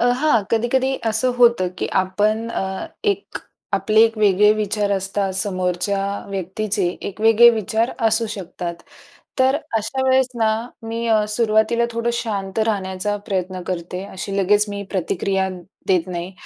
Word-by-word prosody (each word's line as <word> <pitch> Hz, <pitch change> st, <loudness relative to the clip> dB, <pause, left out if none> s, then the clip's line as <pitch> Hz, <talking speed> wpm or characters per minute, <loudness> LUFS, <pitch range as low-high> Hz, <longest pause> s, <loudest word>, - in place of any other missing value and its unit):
अ, -, -, +2 dB, 0.2 s
हां, 295 Hz, -9 st, +3 dB
कधी-कधी 255 Hz, +4 st, +1 dB
असं 225 Hz, +3 st, +1 dB
होतं, 235 Hz, -7 st, +4 dB
की -, -, -1 dB
आपण 210 Hz, +4 st, 0 dB
अ, 190 Hz, -3 st, -3 dB, 0.2 s
एक 200 Hz, -1 st, -1 dB, 0.3 s
आपले 200 Hz, +3 st, +3 dB
एक 225 Hz, 0 st, 0 dB
वेगळे 210 Hz, 0 st, +5 dB
विचार 210 Hz, -1 st, -1 dB
असतात, 195 Hz, 0 st, -1 dB
समोरच्या 185 Hz, 0 st, -1 dB, 0.3 s
व्यक्तीचे 195 Hz, 0 st, -2 dB, 0.2 s
एक 200 Hz, +2 st, -10 dB
वेगळे 225 Hz, +2 st, +7 dB
विचार 225 Hz, +1 st, 0 dB, 0.2 s
असू 225 Hz, +1 st, +2 dB
शकतात. 180 Hz, -3 st, -5 dB, 0.6 s
तर 260 Hz, +2 st, +4 dB, 0.2 s
अशा 225 Hz, +5 st, -2 dB
वेळेस 260 Hz, 0 st, +4 dB
ना, 220 Hz, -, +3 dB, 0.3 s
मी 230 Hz, +1 st, -4 dB
अ, 215 Hz, -1 st, +3 dB
सुरुवातीला 220 Hz, +1 st, +2 dB
थोडं 230 Hz, +1 st, -1 dB
शांत 205 Hz, -4 st, -3 dB
राहण्याचा 200 Hz, -1 st, -1 dB
प्रयत्न 185 Hz, -3 st, -2 dB
करते. 180 Hz, +1 st, -4 dB
अशी 195 Hz, +1 st, -5 dB
लगेच 205 Hz, +2 st, +4 dB
मी 200 Hz, 0 st, -4 dB
प्रतिक्रिया 190 Hz, +1 st, -1 dB, 0.4 s
देत 185 Hz, -2 st, +2 dB
नाही, 175 Hz, +1 st, -5 dB
210 Hz, 140 wpm, -21 LUFS, 190-225 Hz, 0.6 s, वेगळे